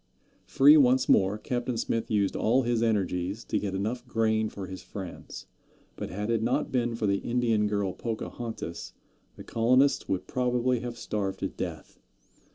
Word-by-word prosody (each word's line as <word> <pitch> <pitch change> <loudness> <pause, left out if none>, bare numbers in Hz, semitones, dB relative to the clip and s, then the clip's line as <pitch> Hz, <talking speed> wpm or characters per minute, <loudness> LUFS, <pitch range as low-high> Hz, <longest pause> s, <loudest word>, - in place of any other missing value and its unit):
Free 145 +3 +7
once 130 -2 +4
more, 95 +2 +4
Captain 120 +2 -3
Smith 115 0 -2
used 100 -3 +1
all 125 +4 +2
his 120 -1 0
energies 100 -2 0
to - - -1
get 100 -2 -3
enough 120 +6 -3
grain 110 -2 +1
for 100 -2 -7
his 95 -1 -8
friends; 90 0 -8 0.5
but - - -5
had 105 +4 -3
it 115 -2 +1
not 125 +6 0
been 120 -2 0
for 110 - -2
the 100 -1 +2
Indian 115 -3 +1
girl 100 -3 -1
Pocahontas 115 -5 -5 0.4
the - - -10
colonists 130 +5 +2
would 95 -1 -1
probably 125 +1 0
have 120 0 -6
starved 105 -4 -3
to - - -1
death. - - -7
115 Hz, 165 wpm, -28 LUFS, 100-120 Hz, 0.5 s, Free